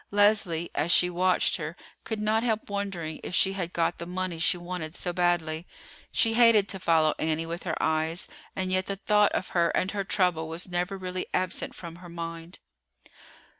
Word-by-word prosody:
Leslie, 205 Hz, -5 st, +3 dB
as 155 Hz, +4 st, +1 dB
she 180 Hz, +1 st, +5 dB
watched 185 Hz, +1 st, +2 dB
her, 160 Hz, 0 st, -5 dB, 0.3 s
could 220 Hz, -1 st, -3 dB
not 215 Hz, +1 st, +2 dB
help 220 Hz, -3 st, -1 dB
wondering 195 Hz, -6 st, -3 dB
if 180 Hz, -, -4 dB
she 190 Hz, +1 st, +3 dB
had 180 Hz, -3 st, -3 dB
got 170 Hz, 0 st, 0 dB
the 170 Hz, -, -5 dB
money 180 Hz, -2 st, -3 dB
she 170 Hz, -, +2 dB
wanted 175 Hz, -2 st, -5 dB
so 175 Hz, -, -2 dB
badly. 175 Hz, -2 st, 0 dB, 0.4 s
She 225 Hz, -1 st, +2 dB
hated 225 Hz, -3 st, +6 dB
to 190 Hz, -, -3 dB
follow 160 Hz, -3 st, +3 dB
Annie 160 Hz, +1 st, 0 dB
with 170 Hz, +2 st, -5 dB
her 165 Hz, -, -1 dB
eyes, 160 Hz, +2 st, 0 dB, 0.3 s
and 185 Hz, -1 st, -2 dB
yet 185 Hz, 0 st, +1 dB
the 200 Hz, -, -2 dB
thought 210 Hz, +1 st, +3 dB
of 185 Hz, -, -2 dB
her 170 Hz, -1 st, +2 dB
and 185 Hz, -, 0 dB
her 200 Hz, -1 st, -2 dB
trouble 180 Hz, -5 st, +1 dB
was 165 Hz, +3 st, -2 dB
never 180 Hz, +2 st, -2 dB
really 185 Hz, -1 st, -4 dB
absent 185 Hz, -1 st, 0 dB
from 170 Hz, -1 st, -9 dB
her 175 Hz, 0 st, -12 dB
mind. 165 Hz, 0 st, -6 dB
180 Hz, 190 wpm, -27 LUFS, 165-195 Hz, 0.4 s, hated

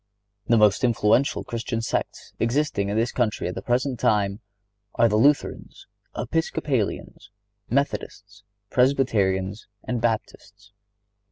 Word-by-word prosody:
The 115 Hz, -, +4 dB
most 105 Hz, 0 st, +4 dB
influential 120 Hz, +2 st, +2 dB
Christian 115 Hz, 0 st, -4 dB
sects 115 Hz, -, -4 dB
existing 115 Hz, -4 st, 0 dB
in 105 Hz, -, -1 dB
this 115 Hz, +2 st, +1 dB
country 115 Hz, -4 st, -1 dB
at 90 Hz, -, -3 dB
the -, -, -6 dB
present 125 Hz, +1 st, -1 dB
time 100 Hz, -1 st, +1 dB, 0.6 s
are 115 Hz, -, +4 dB
the 105 Hz, -, 0 dB
Lutherans, 140 Hz, +7 st, +1 dB, 0.3 s
Episcopalians, 140 Hz, -12 st, -2 dB, 0.4 s
Methodists, 105 Hz, -6 st, -3 dB, 0.3 s
Presbyterians 105 Hz, -7 st, +1 dB, 0.2 s
and 120 Hz, -2 st, -3 dB
Baptists. 105 Hz, -3 st, -4 dB
115 Hz, 110 wpm, -24 LUFS, 105-125 Hz, 0.6 s, The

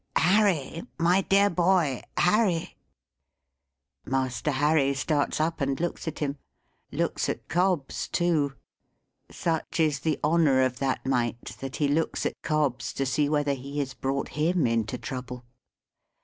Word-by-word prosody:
"Harry, 180 Hz, -4 st, +2 dB, 0.2 s
my 175 Hz, +3 st, +3 dB
dear 200 Hz, +1 st, +4 dB
boy! 175 Hz, -7 st, +2 dB, 0.2 s
Harry!" 180 Hz, -3 st, +2 dB, 1.3 s
Master 130 Hz, +2 st, -1 dB
Harry 145 Hz, 0 st, +2 dB
starts 145 Hz, +3 st, 0 dB
up 160 Hz, 0 st, -1 dB
and 135 Hz, -1 st, 0 dB
looks 170 Hz, 0 st, -3 dB
at 160 Hz, -, -3 dB
him. 145 Hz, -1 st, -3 dB, 0.5 s
Looks -, -, -1 dB
at -, -, -4 dB
Cobbs 175 Hz, -5 st, 0 dB
too. 160 Hz, -6 st, +1 dB, 0.7 s
Such 165 Hz, 0 st, -2 dB
is 155 Hz, -3 st, +2 dB
the 155 Hz, +1 st, -1 dB
honour 150 Hz, -4 st, +4 dB
of 125 Hz, -1 st, -1 dB
that 135 Hz, -1 st, -1 dB
mite, 120 Hz, -2 st, -1 dB
that 135 Hz, -1 st, -6 dB
he 145 Hz, -, +1 dB
looks 155 Hz, +3 st, 0 dB
at -, -, -3 dB
Cobbs, 150 Hz, -5 st, -1 dB
to 135 Hz, -, -1 dB
see 145 Hz, +3 st, +1 dB
whether 145 Hz, -1 st, +1 dB
he 140 Hz, +2 st, -7 dB
has 135 Hz, -3 st, -2 dB
brought 135 Hz, +1 st, -2 dB
him 160 Hz, +1 st, +1 dB
into 115 Hz, 0 st, 0 dB
trouble. 125 Hz, -1 st, -6 dB
145 Hz, 140 wpm, -27 LUFS, 135-165 Hz, 1.3 s, dear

